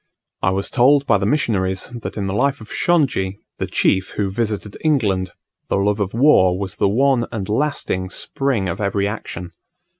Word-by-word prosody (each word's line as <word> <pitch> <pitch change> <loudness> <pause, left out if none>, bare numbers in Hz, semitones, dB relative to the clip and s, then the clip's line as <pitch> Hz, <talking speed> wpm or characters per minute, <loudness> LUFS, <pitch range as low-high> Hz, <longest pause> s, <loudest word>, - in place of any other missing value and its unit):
I 95 - +2
was 95 +1 -1
told 135 +3 +4
by - - +3
the - - 0
missionaries 100 -10 0
that 120 -2 -6
in 100 - -2
the 95 - -2
life 140 +6 +1
of 110 - -12
Shongi, 130 - +1 0.2
the - - -2
chief 95 0 +1
who 100 -2 0
visited 105 -1 -2
England, 105 - +1 0.4
the - - 0
love 100 +2 +1
of 100 +1 -2
war 105 -9 +5
was 100 +1 -4
the 100 - +2
one 125 +2 +2
and 105 -5 -4
lasting 105 -7 -1
spring 130 -3 -1
of 90 +4 -3
every 100 0 0
action. 90 -4 -6
105 Hz, 180 wpm, -20 LUFS, 95-130 Hz, 0.4 s, war